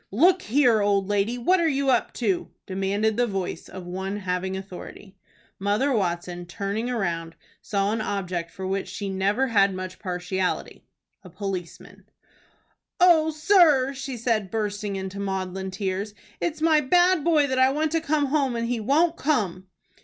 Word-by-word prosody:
"Look 350 - +4
here, 245 - +3
old 200 -1 +2
lady, 205 +4 +1
what 360 +10 +3
are 335 - +2
you 275 -2 +1
up 240 - +1
to?" 200 -7 -1 0.2
demanded 200 +3 0
the 245 0 +2
voice 195 -4 -4
of 185 -1 -8
one 190 +3 -4
having 190 -1 -2
authority. 190 +1 -10 0.4
Mother 210 +8 +1
Watson, 175 -3 -2
turning 200 +6 -3
round, 170 -8 -2 0.3
saw 200 0 0
an 220 0 -1
object 180 -5 -3
for 190 +3 -7
which 195 +1 -2
she 200 -1 -5
never 200 +7 +1
had 200 -3 +3
much 185 0 -6
partiality, 185 -1 -3 0.4
a - - -11
policeman. 190 -5 -7 0.9
"O 335 -3 +5
sir," 310 -5 +4
said 245 -5 -1
she, - - -11
bursting 205 -1 -2
into 190 +1 -5
maudlin 190 -1 -3
tears, 195 +2 -3 0.2
"it's 315 -2 -2
my 315 -2 +5
bad 350 +3 +3
boy 315 -4 +4
that 260 -2 -1
I 260 0 +6
want 305 +2 0
to 330 0 +1
come 310 -2 +1
home, 275 -3 0
and 230 0 -1
he 240 -1 -1
won't 320 +9 +2
come." 195 - -1
205 Hz, 160 wpm, -25 LUFS, 190-275 Hz, 0.9 s, I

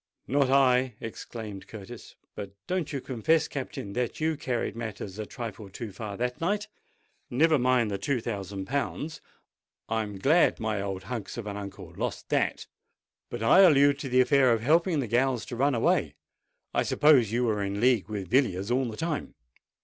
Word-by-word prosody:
"Not 140 -1 +2
I!" 130 -3 +4
exclaimed 110 -3 -7
Curtis. 110 +2 -10 0.2
"But 100 -1 -8
don't 180 -3 -2
you 140 -3 -3
confess, 150 +7 +1
Captain, 130 -7 -6
that 125 +1 -2
you 160 0 +1
carried 125 -5 -2
matters 105 -3 -6
a 105 - -4
trifle 115 -4 -7
too 105 +3 -7
far 100 0 -6
that 125 +5 -2
night? 205 +5 0 0.6
Never 155 +4 +3
mind 125 -3 +2
the 100 - -2
two 125 +6 0
thousand 100 -4 -5
pounds: 140 +5 -3 0.7
I'm 110 -3 -2
glad 155 - +3
my 110 -2 -1
old 95 -1 -4
hunks 110 +3 -5
of 115 - -5
an 100 -1 -5
uncle 100 -1 -7
has - - -17
lost - - -3
that! - - 0 0.6
But 120 -2 -5
I 115 - +6
allude 145 -6 +6
to 140 - -5
the 130 +1 +5
affair 130 0 +4
of 115 -1 +2
helping 160 +4 +3
the 125 - -3
gals 125 +1 +1
to 120 - -6
run 135 +2 +2
away. 115 - +1 0.6
I - - +2
suppose 140 -8 +4
you 120 +2 +1
were 110 -3 +1
in 100 0 -2
league 120 -4 +3
with 100 -3 -5
Villiers 115 -6 +2
all 130 +2 +2
the 110 -3 -6
time?" 160 -3 -3
120 Hz, 180 wpm, -28 LUFS, 105-140 Hz, 0.7 s, I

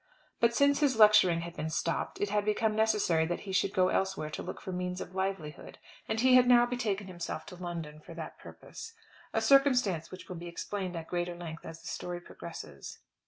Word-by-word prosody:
But 235 0 +3
since 280 +1 +4
his 280 -6 +2
lecturing 210 -6 +6
had 170 0 -7
been 160 - -3
stopped, - - -2
it 205 -1 -1
had 210 0 +2
become 215 +1 +1
necessary 210 -7 +3
that 175 - -3
he 195 - -7
should 190 +1 +2
go 185 -1 +3
elsewhere 190 -6 -1
to - - -4
look - - -6
for 190 - -6
means 180 0 -3
of 185 - -7
livelihood, 190 -5 -4 0.3
and 220 - 0
he 255 +2 +5
had 250 -1 +7
now 240 -1 +7
betaken 225 -5 -2
himself 175 -2 -5
to 180 - -10
London 170 -4 -6
for 165 +2 -12
that 160 -1 -7
purpose, 455 - -10 0.4
a - - 0
circumstance 250 - +4
which 185 - -10
will 180 - -6
be 175 +1 -7
explained 185 +1 -4
at 165 -1 -5
greater 175 0 -2
length 165 -2 -8
as 165 0 -9
the - - -9
story 175 0 -4
progresses. 165 - -9
185 Hz, 210 wpm, -31 LUFS, 170-220 Hz, 0.4 s, had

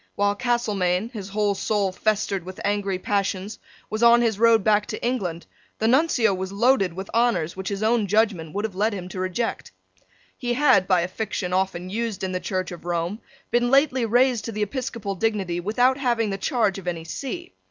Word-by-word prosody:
While 205 0 +2
Castelmaine, 210 -4 0
his 205 -5 -7
whole 205 0 +1
soul 200 -1 0
festered 200 -1 -1
with 185 +1 -9
angry 200 -2 0
passions, 200 +1 -2 0.3
was 215 +1 -4
on 235 0 +6
his 220 -3 0
road 230 -2 +5
back 210 0 +3
to 215 - -5
England, 185 -9 -2 0.3
the 220 - 0
Nuncio 245 -5 +3
was 190 0 -4
loaded 210 -2 +3
with 190 +2 -6
honours 230 -9 +1
which 190 0 -4
his 200 +1 -3
own 220 -1 +2
judgment 200 -6 +1
would 205 +2 -1
have 220 - -4
led 210 +4 0
him 180 -2 -6
to 185 - -6
reject. 185 +5 -2 0.6
He 245 -2 -2
had, 255 -9 +4
by 185 -2 +3
a 175 - -1
fiction 185 -2 -3
often 185 -1 -1
used 225 -2 -3
in 190 - -1
the 185 - -2
Church 185 0 -3
of 175 - -9
Rome, 175 +4 -2 0.3
been 240 0 +2
lately 270 -1 +3
raised 245 +1 +2
to 230 - -4
the 210 -1 -1
episcopal 225 -2 -4
dignity 195 -4 -1
without 245 +8 +2
having 235 -5 +1
the 195 - -2
charge 205 -2 0
of 180 - -12
any 170 -2 -3
see. 315 - -6
205 Hz, 195 wpm, -24 LUFS, 185-235 Hz, 0.6 s, on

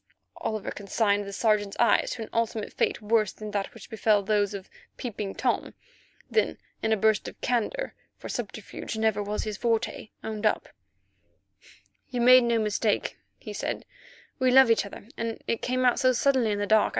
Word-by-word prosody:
Oliver 215 -2 -3
consigned 205 0 0
the 200 - -6
Sergeant's 205 -1 +1
eyes 235 - +4
to 230 - -5
an - - -9
ultimate 225 -2 -1
fate - - 0
worse 215 -2 +2
than 215 -1 -8
that 200 -1 -2
which - - -11
befell 215 -2 +2
those 205 0 +1
of 195 -1 -7 0.3
Peeping 210 -5 -4
Tom; - - -1 0.5
then, 440 - +1 0.2
in 220 - 0
a 220 - +4
burst 215 0 +2
of - - -9
candour, 250 - -1 0.2
for - - -8
subterfuge - - -5
never 220 -2 +1
was 205 +1 -2
his 215 -1 -4
forte, 225 -2 -1
owned 220 0 -1
up: - - -1 1.4
"You 250 - -3
made 250 +1 +7
no 235 -1 +2
mistake," 215 0 0 0.2
he - - -8
said, - - -3 0.5
"we 260 -1 +3
love 260 -1 +7
each 220 -2 +2
other, 200 - -11
and 230 -1 -3
it 230 - -1
came 255 0 0
out 245 - +4
suddenly 255 -1 +3
in 205 - 0
the 205 - 0
dark. 215 0 +4
220 Hz, 175 wpm, -27 LUFS, 205-235 Hz, 1.4 s, made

